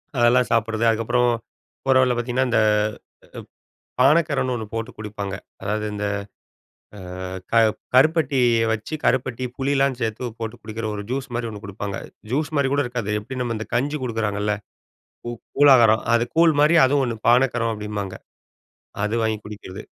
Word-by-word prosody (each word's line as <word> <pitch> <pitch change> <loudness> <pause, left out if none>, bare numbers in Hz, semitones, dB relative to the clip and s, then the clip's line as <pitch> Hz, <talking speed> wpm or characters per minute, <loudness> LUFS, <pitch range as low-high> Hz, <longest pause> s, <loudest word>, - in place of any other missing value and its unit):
அதெல்லாம் 120 0 +3
சாப்பிடுறது 115 0 +1
அதுக்கப்புறம் 115 +2 +2 0.6
போற 135 -1 +3
வழில 125 -1 +3
பார்த்தீங்கன்னா! 125 +2 0
இந்த 115 - +3 1.4
ப் - - +4
பானக்கரன்னு 140 -2 +3
ஒண்ணு 110 -2 -4
போட்டு 115 0 -3
குடிப்பாங்க! 100 -2 -5 0.3
அதாவது, 105 +1 -2
இந்த 105 0 -3 0.9
அ - - -9 0.5
க - - 0 0.4
கருப்பட்டிய 130 -6 +3
வச்சு 110 +7 -4
கருப்பட்டி, 130 0 0
புளிலாம் 135 -1 +1
சேர்த்து 115 +2 -2
போட்டு 115 -1 -4
குடிக்கிற, 110 +1 -6
ஒரு 100 - -4
ஜூஸ் 130 0 -2
மாதிரி 120 -1 -2
ஒண்ணு 105 -1 -8
குடுப்பாங்க. 100 0 -5 0.3
ஜூஸ் 145 +3 0
மாரி 140 -1 +2
கூட 145 - +2
இருக்காது, 120 -4 -4
எப்படி 125 +5 -8
நம்ம 120 -2 -2
இந்த 110 - -5
கஞ்சி 145 +5 0
குடுக்குறாங்கல்ல! 105 -3 -1 0.7
கூ 120 - -4 0.3
கூழாகாரம். 120 -6 +6
அது 120 0 +3
கூழ் 165 -1 +6
மாதிரி 155 +3 +5
அதுவும் 140 +1 +3
ஒண்ணு 115 -2 -3
பானக்கரம், 120 -2 +3
அப்படிம்பாங்க. 105 -2 -5 0.9
அது 105 +2 -1
வாங்கி 110 -1 0
குடிக்கிறது. 105 -1 -9
120 Hz, 145 wpm, -22 LUFS, 110-130 Hz, 1.4 s, கூழாகாரம்